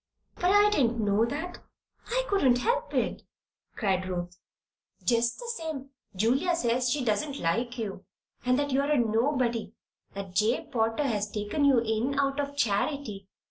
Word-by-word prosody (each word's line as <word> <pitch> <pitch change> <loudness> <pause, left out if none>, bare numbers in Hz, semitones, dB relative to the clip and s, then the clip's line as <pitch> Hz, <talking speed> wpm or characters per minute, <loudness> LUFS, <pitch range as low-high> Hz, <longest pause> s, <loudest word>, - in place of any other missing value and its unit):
"But - - -4
I 410 +1 +5
didn't 240 - +2
know 210 +1 +3
that. 315 +9 -5 0.5
I - - 0
couldn't 270 -12 +3
help 475 - 0
it," - - 0 0.5
cried 190 -3 0
Ruth. 175 -1 -4 0.7
"Just 235 0 +2
the 480 - -8
same, 310 - -5 0.3
Julia 260 - +2
says 245 -3 +1
she 270 0 0
doesn't 270 +6 -1
like 235 +9 -1
you 200 -5 -4 0.4
and 250 0 +2
that 285 0 0
you're 280 +2 +1
a 300 - +4
nobody 235 0 +1 0.4
that 195 -2 -6
Jabe 220 +9 +1
Potter 225 +2 +1
has 210 -6 -1
taken 210 +8 -1
you 275 -3 +5
in 230 +4 0
out 275 0 +1
of 285 0 -3
charity. 215 -3 -1
245 Hz, 155 wpm, -28 LUFS, 215-285 Hz, 0.7 s, I